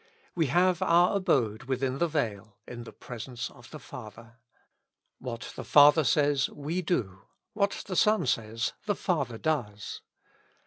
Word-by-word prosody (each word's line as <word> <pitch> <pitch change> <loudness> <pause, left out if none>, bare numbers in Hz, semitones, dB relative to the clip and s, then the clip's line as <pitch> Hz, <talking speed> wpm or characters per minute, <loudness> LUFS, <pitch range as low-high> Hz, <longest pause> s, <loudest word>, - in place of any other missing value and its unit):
We 165 -4 +1
have 180 +5 +2
our 175 +1 +4
abode 120 - +1
within 130 0 -1
the 170 - +2
veil, 110 -9 -3
in 120 -1 -8
the - - -10
presence 125 0 -7
of 120 - -16
the 155 - -8
Father. 115 -3 -11 0.8
What 120 -2 -6
the - - -6
Father 150 +2 +7
says, 145 +1 +2
we 155 +5 -3
do; 105 - -2 0.3
what 200 -1 0
the 185 - -4
Son 210 -3 +3
says, 115 0 -1
the 205 - +1
Father 140 - -1
does. 110 -9 -3
135 Hz, 145 wpm, -28 LUFS, 115-170 Hz, 0.8 s, Father